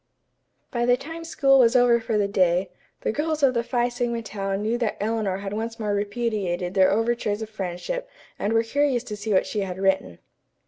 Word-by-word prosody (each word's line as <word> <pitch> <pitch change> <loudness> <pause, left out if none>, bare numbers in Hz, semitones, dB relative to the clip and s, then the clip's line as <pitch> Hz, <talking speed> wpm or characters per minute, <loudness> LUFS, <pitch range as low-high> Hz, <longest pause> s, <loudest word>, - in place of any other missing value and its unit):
By 240 -1 0
the 245 0 +5
time 325 +5 -8
school 275 -4 +3
was 235 -1 +5
over 245 -1 +5
for 225 -1 -1
the 205 -1 +2
day, 185 -2 +2 0.3
the - - 0
girls 305 +3 -2
of 265 -2 +5
the 235 - +1
Phi 240 0 +1
Sigma 240 -1 -2
Tau 195 -3 -3
knew 215 +4 -1
that 230 -3 -1
Eleanor 210 -3 -1
had 195 0 -5
once 225 +2 -4
more 210 -2 -1
repudiated 205 -4 -2
their 190 -1 +5
overtures 225 0 0
of 220 - -9
friendship 215 - -4 0.3
and 205 - -1
were 225 0 +3
curious 265 +1 +1
to 215 -4 -6
see 210 +1 -4
what 190 - +3
she 210 - -3
had 190 -2 -3
written. 190 - 0
220 Hz, 200 wpm, -24 LUFS, 195-245 Hz, 0.3 s, the